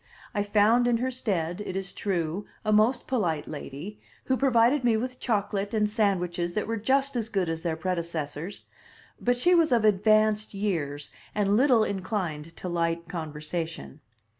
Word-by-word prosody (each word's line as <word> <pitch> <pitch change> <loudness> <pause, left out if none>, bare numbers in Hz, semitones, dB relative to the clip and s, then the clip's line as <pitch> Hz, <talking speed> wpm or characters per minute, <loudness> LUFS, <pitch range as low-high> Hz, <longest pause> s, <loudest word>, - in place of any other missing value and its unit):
I 205 - 0
found 215 +4 +3
in 240 -1 +3
her 255 +2 -1
stead, 190 -7 -2
it 185 - -5
is 195 0 -3
true, 180 0 -2 0.2
a 215 - +2
most 225 +5 +3
polite 170 - -1
lady, 155 +7 -7 0.2
who 260 - +1
provided 255 +1 +3
me 235 -2 +3
with 255 +2 -4
chocolate 205 -2 -1
and 210 -1 +3
sandwiches 180 -5 0
that 210 - 0
were 225 +1 -2
just 270 +5 +1
as 225 -2 -1
good 190 -6 0
as 165 0 -3
their 165 -2 -1
predecessors; 170 -1 -4 0.6
but 245 0 +1
she 350 +9 +3
was 330 -4 +4
of 230 -3 +3
advanced 215 +1 +3
years, 155 -8 -2 0.2
and 205 -1 +2
little 250 -2 +5
inclined 185 -6 -3
to - - -6
light 170 -1 -1
conversation. 160 - -5
205 Hz, 165 wpm, -27 LUFS, 170-230 Hz, 0.6 s, little